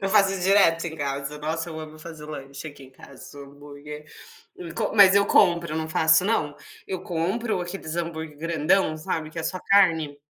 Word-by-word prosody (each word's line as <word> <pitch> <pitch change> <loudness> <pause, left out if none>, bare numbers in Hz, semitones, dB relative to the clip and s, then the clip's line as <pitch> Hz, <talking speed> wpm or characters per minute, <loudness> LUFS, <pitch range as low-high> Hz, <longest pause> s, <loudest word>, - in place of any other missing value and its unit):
Eu 195 - -1
faço 195 -1 +4
isso 190 - -4
direto 185 -4 +4
em 160 -1 -6
casa, 140 0 -4
nossa 160 +2 -3
eu 160 - -7
amo 155 0 -9
fazer 155 -1 -10
lanche 140 0 -8
aqui 145 -2 -13
em 130 - -16
casa, 140 +2 -14
um - - -8
hambúrguer, 145 +1 -11 0.7
com - - -2
mas 200 -2 +7
eu 200 0 +5
compro, 170 -4 +3
não 160 0 -3
faço 160 +3 +4
não, 150 -9 0 0.3
eu 185 -1 -5
compro 185 +5 -2
aqueles 175 -2 -6
hambúrguer 160 -3 -5
grandão, 165 +1 +1
sabe, 155 0 -4
que 165 - -9
é - - -2
só 185 +3 -3
carne, 160 -7 +3
160 Hz, 190 wpm, -24 LUFS, 150-185 Hz, 0.7 s, mas